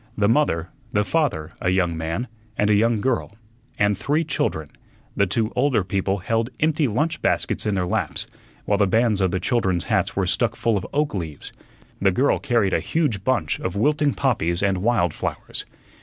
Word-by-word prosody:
The 100 -1 +3
mother, 100 - +2 0.2
the 105 -2 +2
father, 115 - 0
a 90 - +1
young 90 -2 +1
man, 80 +9 -3 0.3
and 105 0 +2
a - - +5
young 110 +1 +2
girl, 120 -4 -1 0.4
and 105 0 +2
three 145 - 0
children. 80 - -2 0.4
The 100 - +2
two 110 +4 0
older 125 -5 +2
people 95 +1 -1
held 115 +5 -1
empty 155 -1 +2
lunch 150 +9 -1
baskets - - 0
in 105 - +1
their 90 -2 0
laps, 95 -5 -2 0.4
while 100 - +1
the 100 - +4
bands 110 0 +2
of 95 - +3
the 95 - -1
children's 95 -5 0
hats 105 -4 0
were 95 - +1
stuck 115 +5 0
full 115 -1 +1
of 100 - -2
oak 150 +1 0
leaves. 80 -7 -5 0.5
The 95 - +5
girl 130 +10 +2
carried 115 -8 +1
a - - +3
huge 140 - -1
bunch 110 -12 0
of 95 - -3
wilting 145 +5 +2
poppies 95 - 0
and 95 -2 +1
wild 100 -6 +1
flowers. - - -2
105 Hz, 185 wpm, -23 LUFS, 95-125 Hz, 0.5 s, a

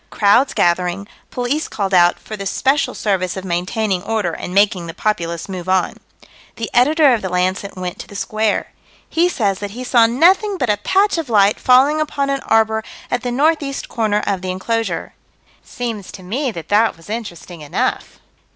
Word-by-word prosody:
Crowds 220 +6 +3
gathering 180 +3 +1 0.2
police 255 +5 -2
called 195 -2 -3
out 175 -1 +5
"for 215 - -8
the 200 -1 -5
special 270 +4 +1
service 190 -3 -1
of 190 - -6
maintaining 185 +2 -1
order 210 -3 -1
and 175 - -6
making 195 -3 +2
the 165 - -8
populace 170 -6 -2
move 185 -2 -6
on." 185 -1 +1 0.6
The 230 - -5
Editor 285 +3 +5
of 230 - 0
the 190 - -3
Lancet 185 +2 -1
went 180 -1 -5
to - - -8
the 200 - -13
Square. 215 +1 -1 0.4
He 345 +2 +2
says 200 - -1
that 205 +2 -6
he 255 - -5
saw 240 -2 +4
nothing 370 - +3
but 250 -9 +1
a 205 - 0
patch 385 - +2
of 310 -6 -5
light 205 -2 +3
falling 270 +5 +4
upon 280 -2 -1
an 275 -1 -1
arbor 220 0 +2 0.3
at 245 - 0
the 250 -1 -3
northeast 285 +1 0
corner 215 -3 0
of 195 -2 -1
the 185 - -4
enclosure. 225 +5 -2 0.5
Seems 230 -5 -5
to 185 - -10
me 255 +10 -2
that 165 -8 -8
that 210 -2 +3
was 165 - -17
interesting 185 -6 -7
enough. 145 - -2
215 Hz, 185 wpm, -18 LUFS, 185-250 Hz, 0.6 s, out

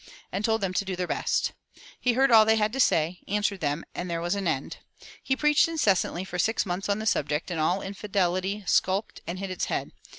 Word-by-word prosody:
and 200 - -3
told 225 0 +1
them 190 -2 -1
to 190 - +1
do 190 -1 -4
their 180 0 -2
best. - - 0 0.5
He 250 - +2
heard 265 +2 +3
all 220 -1 +9
they 220 +1 +4
had 215 0 +1
to 270 - -3
say, 165 -6 +2
answered 205 -1 0
them, 150 0 -2
and 180 - -5
there 170 -1 -2
was 175 +2 -1
an 200 -2 -2
end. 140 -4 -2 0.4
He 265 - 0
preached 300 +2 +4
incessantly 200 - +1
for 180 -1 -6
six 220 +6 +1
months 185 +2 -3
on 200 - +2
the 215 - -5
subject, 150 -3 0
and 165 - -2
all 180 +5 +1
infidelity 195 0 -1
skulked 190 +3 +1
and 175 - -4
hid 195 0 -5
its 185 - -2
head. - - -3
195 Hz, 225 wpm, -27 LUFS, 175-215 Hz, 0.5 s, all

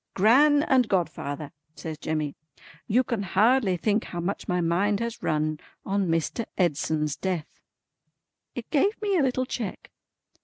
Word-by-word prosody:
"Gran 285 +9 +5
and 255 -5 +3
godfather," 150 -5 -2 0.2
says 160 -2 -6
Jemmy, 155 -2 -2 0.5
"you 245 +5 +3
can 235 -5 -2
hardly 200 +1 +3
think 210 +5 0
how 175 - -6
much 180 +4 -3
my 180 0 0
mind 185 +5 +1
has 235 0 -4
run 155 0 0 0.3
on 195 -1 0
Mr. 165 +7 -1
Edson's 155 -3 0
death." 180 -5 -4 0.9
It 245 - -7
gave 390 +9 +2
me 410 -2 0
a - - +3
little 255 -1 +1
check. 230 -6 -5
195 Hz, 145 wpm, -26 LUFS, 165-245 Hz, 0.9 s, Gran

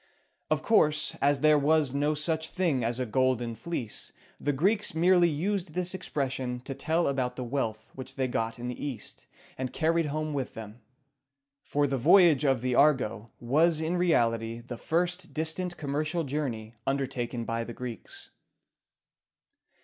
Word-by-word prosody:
Of - - +1
course, 150 -9 +3
as 140 -1 +3
there 155 -1 +5
was 150 -2 +2
no 145 +2 +1
such 160 +1 -1
thing 165 -9 0
as 120 +2 -1
a 130 - 0
Golden 125 0 +1
Fleece, 115 -2 -5 0.3
the 145 - 0
Greeks 195 +7 +1
merely 175 +1 +5
used 175 +2 -2
this 180 0 -1
expression 135 -7 -2
to 135 - -5
tell 160 +5 0
about 130 -3 -1
the 125 - -4
wealth 115 -4 -3
which 130 0 -9
they 130 -2 0
got 115 -1 -2
in 120 0 -5
the 125 - -5
East, 130 -7 -6 0.3
and 130 -2 -2
carried 165 0 +1
home 155 +1 -2
with 135 -3 -3
them; 110 +1 -9 0.8
for 145 0 0
the 135 -2 -1
voyage 165 +1 +6
of 135 -4 +2
the 125 0 0
"Argo" 125 -6 +2
was 155 +7 +3
in 160 +2 -1
reality 115 -10 +1
the 120 +1 -7
first 175 +6 -1
distant 175 +3 -2
commercial 155 +3 -1
journey 130 -6 -3
undertaken 130 -3 -2
by 115 0 -2
the 120 - -7
Greeks. 120 -3 -8
140 Hz, 155 wpm, -28 LUFS, 125-160 Hz, 0.8 s, voyage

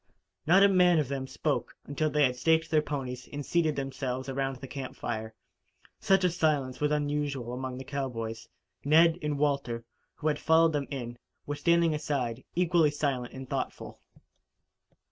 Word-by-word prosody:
Not 190 +4 +6
a - - +8
man 180 -3 +5
of 150 -4 0
them 135 -1 -3
spoke - - -2
until 155 +2 -1
they 150 0 +2
had 125 -2 +2
staked 160 +4 +2
their 155 -1 +4
ponies 130 -4 -5
and 145 -1 -5
seated 160 -3 +1
themselves 130 -1 -3
around 135 0 -2
the 135 +1 -9
camp 135 -1 -6
fire. 110 -1 -4 0.6
Such 195 -1 +3
a 180 - +3
silence 150 -7 0
was 150 - +2
unusual 145 -4 -1
among 130 0 -4
the 130 - -6
cowboys. 120 -5 -4 0.3
Ned 165 +3 +5
and 150 -2 -1
Walter, 140 -5 -1 0.3
who 155 - -3
had 150 -1 +1
followed 160 0 +4
them 145 -2 -1
in, 120 -4 -6 0.3
were 145 - -3
standing 170 +1 +3
aside, 130 -5 -2
equally 170 -3 +3
silent 140 -4 -2
and 130 0 -7
thoughtful. - - -4
145 Hz, 165 wpm, -29 LUFS, 130-155 Hz, 0.6 s, a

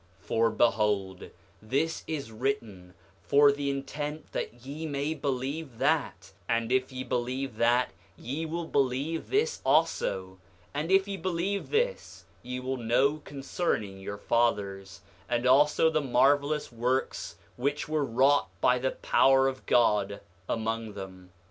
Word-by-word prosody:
7:9 - - -24
For 115 +1 +2
behold, 105 -4 +1 0.3
this 140 +9 -1
is 145 -7 -4
written 110 -7 -3 0.3
for 145 0 +5
the 140 0 -2
intent 145 +2 -4
that 120 +1 -5
ye 150 +4 -5
may 145 +1 -1
believe 140 -1 -3
that; - - 0 0.2
and 115 0 0
if 130 0 +1
ye 130 0 -5
believe 125 0 -3
that 120 +2 +3 0.3
ye 140 +7 -4
will 165 +1 -3
believe 140 +3 -1
this 450 +4 +1
also; 95 - +1 0.3
and 150 +3 -2
if 195 +1 +4
ye 200 -1 -4
believe 185 +3 -2
this 485 +2 -1 0.2
ye 125 +1 -5
will 130 +1 -3
know 125 +5 +2
concerning 135 - -3
your 100 +1 -6
fathers, 100 -5 -1 0.3
and 120 0 0
also 145 +5 +5
the 160 -1 +2
marvelous 145 +3 +2
works 125 +3 -1 0.2
which 140 +4 -1
were 155 -1 0
wrought 135 0 +3
by 125 +4 +3
the 130 +1 0 0.2
power 135 0 +5
of 130 -1 -5
God 105 -4 +3 0.3
among 115 -1 -2
them. 95 -2 -9
130 Hz, 140 wpm, -28 LUFS, 115-150 Hz, 0.3 s, for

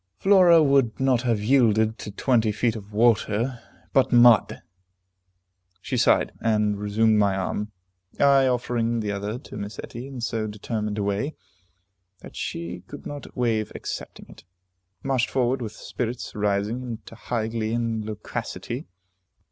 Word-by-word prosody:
Flora 180 -5 +6
would 135 -5 +2
not 130 -3 +2
have 115 -5 0
yielded 110 -3 +3
to - - -6
twenty 115 +1 +1
feet 110 +2 0
of 105 -1 -9
water, 115 +2 +1 0.3
but 135 - +3
mud! 120 -2 +5 1.2
She - - -4
sighed, - - +3
and 105 -2 +1
resumed 105 +1 +2
my 100 -2 +3
arm. 105 +2 -3 0.5
I, 140 -1 +5
offering 120 -2 0
the 105 -1 -2
other 100 +3 -3
to 125 - -10
Miss 100 +2 -6
Etty 120 +3 -8
in 135 -2 -8
so 115 -2 -2
determined 105 0 -4
a 105 - -1
way, 100 +10 -2 0.9
that - - -12
she 85 +1 -5
could - - -10
not 145 -1 -8
waive 110 -3 0
accepting - - -7
it, - - -15 0.6
marched 130 -4 +1
forward 130 +1 0
with 110 -3 -5
spirits 120 +2 -5
rising 105 +3 -1
into 120 -3 -8
high 115 -1 -3
glee 110 0 -2
and 115 -2 -1
loquacity. 105 0 -5
115 Hz, 145 wpm, -24 LUFS, 105-125 Hz, 1.2 s, Flora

